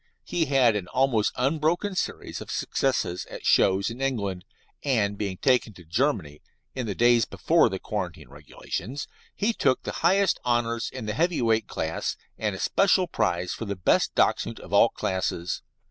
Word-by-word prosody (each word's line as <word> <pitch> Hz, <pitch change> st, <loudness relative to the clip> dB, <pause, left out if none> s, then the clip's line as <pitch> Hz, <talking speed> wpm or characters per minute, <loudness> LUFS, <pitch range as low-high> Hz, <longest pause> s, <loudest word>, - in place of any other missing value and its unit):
He 170 Hz, -2 st, 0 dB
had 130 Hz, -6 st, +4 dB
an 100 Hz, -4 st, -3 dB
almost 125 Hz, -4 st, +2 dB
unbroken 160 Hz, +9 st, 0 dB
series 185 Hz, -, -3 dB
of -, -, -9 dB
successes 90 Hz, -10 st, -1 dB
at -, -, -9 dB
shows 95 Hz, +3 st, +3 dB
in 120 Hz, +3 st, -8 dB
England, 100 Hz, -9 st, -2 dB, 0.4 s
and 110 Hz, -8 st, +1 dB
being 100 Hz, -2 st, -3 dB
taken 125 Hz, -2 st, +2 dB
to 90 Hz, -, -14 dB
Germany 85 Hz, -, -1 dB, 0.3 s
(in 130 Hz, -3 st, -4 dB
the 100 Hz, -, -3 dB
days 120 Hz, -1 st, +4 dB
before -, -, +2 dB
the -, -, -3 dB
quarantine -, -, -5 dB
regulations), 130 Hz, +10 st, -6 dB, 0.3 s
he 220 Hz, +3 st, +1 dB
took 130 Hz, -, +1 dB
the -, -, -3 dB
highest 190 Hz, +3 st, +3 dB
honours 120 Hz, -1 st, 0 dB
in 130 Hz, -4 st, -7 dB
the 105 Hz, -, -2 dB
heavy 170 Hz, +7 st, +1 dB
weight 110 Hz, -2 st, +2 dB
class, 80 Hz, +1 st, -3 dB, 0.2 s
and 105 Hz, -3 st, -2 dB
a -, -, -8 dB
special 190 Hz, -1 st, +3 dB
prize 90 Hz, -, -1 dB
for 115 Hz, -, -5 dB
the 100 Hz, -1 st, -3 dB
best 90 Hz, -, +2 dB
Dachshund -, -, +1 dB
of -, -, -11 dB
all -, -, +6 dB
classes. 90 Hz, -2 st, -2 dB
115 Hz, 170 wpm, -26 LUFS, 100-135 Hz, 0.4 s, all